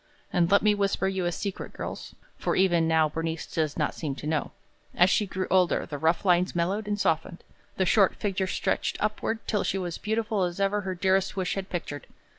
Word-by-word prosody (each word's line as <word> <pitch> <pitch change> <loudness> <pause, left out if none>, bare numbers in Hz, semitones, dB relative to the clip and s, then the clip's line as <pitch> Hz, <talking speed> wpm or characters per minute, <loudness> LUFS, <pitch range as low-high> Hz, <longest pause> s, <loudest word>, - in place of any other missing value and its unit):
And 175 -2 +3
let 200 +1 +4
me 210 -1 +5
whisper 200 -1 0
you 190 -2 -1
a - - 0
secret, 195 +3 -5
girls, - - -7 0.2
for - - -1
even 175 -3 +3
now 160 -1 +4
Bernice 160 +1 -3
does 155 -3 -2
not - - 0
seem 145 -4 -4
to 145 - -8
know, 155 -1 -1 0.5
as 180 +2 +5
she 210 - +2
grew 185 0 -3
older, 185 -2 +3
the 145 - -6
rough 165 +5 +1
lines 180 0 +3
mellowed 190 +5 0
and 205 0 -1
softened, 165 -1 0 0.3
the 190 - +2
short 195 +1 +4
figure 190 -2 -1
stretched - - -1
upward, 215 +2 -2
till 210 -3 0
she 195 - -1
was 175 -3 -4
beautiful 220 -1 -1
as 175 0 -1
ever 200 +1 +1
her 190 -1 -4
dearest 190 +2 +1
wish 185 -1 0
had 195 -1 -4
pictured. 155 -5 -5
185 Hz, 210 wpm, -27 LUFS, 170-200 Hz, 0.5 s, me